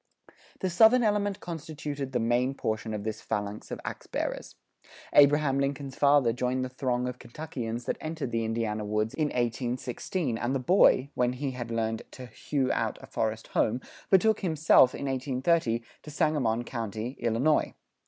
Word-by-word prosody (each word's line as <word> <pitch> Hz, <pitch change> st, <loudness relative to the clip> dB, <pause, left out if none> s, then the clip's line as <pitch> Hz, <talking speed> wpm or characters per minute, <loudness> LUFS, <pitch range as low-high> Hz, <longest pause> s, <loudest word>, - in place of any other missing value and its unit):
The 185 Hz, -, 0 dB
Southern 225 Hz, +7 st, +6 dB
element 205 Hz, -2 st, +1 dB
constituted 150 Hz, -4 st, -5 dB
the 125 Hz, -, 0 dB
main 120 Hz, +4 st, +1 dB
portion 110 Hz, -2 st, -2 dB
of 105 Hz, -, -5 dB
this 110 Hz, 0 st, -4 dB
phalanx 105 Hz, 0 st, -4 dB
of -, -, -5 dB
ax -, -, -6 dB
bearers. -, -, -4 dB, 0.6 s
Abraham 145 Hz, -1 st, +5 dB
Lincoln's 140 Hz, -1 st, -2 dB
father 140 Hz, -5 st, +4 dB
joined 125 Hz, +1 st, -1 dB
the -, -, -5 dB
throng 125 Hz, -1 st, -1 dB
of 125 Hz, 0 st, -5 dB
Kentuckians 120 Hz, -3 st, -6 dB
that -, -, -2 dB
entered 155 Hz, -5 st, -4 dB
the 115 Hz, 0 st, 0 dB
Indiana 110 Hz, -1 st, -2 dB
woods 105 Hz, +1 st, -1 dB
in 155 Hz, -2 st, 0 dB
1816, 125 Hz, +3 st, -2 dB
and 125 Hz, +3 st, -1 dB
the -, -, +1 dB
boy, 140 Hz, -2 st, +4 dB
when 125 Hz, 0 st, +1 dB
he 135 Hz, +1 st, -3 dB
had 120 Hz, -2 st, -6 dB
learned 115 Hz, -1 st, -1 dB
to 130 Hz, -, -8 dB
hew 130 Hz, +3 st, -2 dB
out -, -, -1 dB
a -, -, -11 dB
forest 110 Hz, 0 st, -3 dB
home, 115 Hz, +3 st, +1 dB, 0.3 s
betook 215 Hz, +3 st, +4 dB
himself, 155 Hz, -7 st, +4 dB
in -, -, -5 dB
1830, 130 Hz, -1 st, 0 dB, 0.2 s
to -, -, -11 dB
Sangamon 145 Hz, -7 st, +1 dB
county, 115 Hz, -1 st, -4 dB
Illinois. 120 Hz, +6 st, +1 dB
130 Hz, 165 wpm, -28 LUFS, 115-150 Hz, 0.6 s, Southern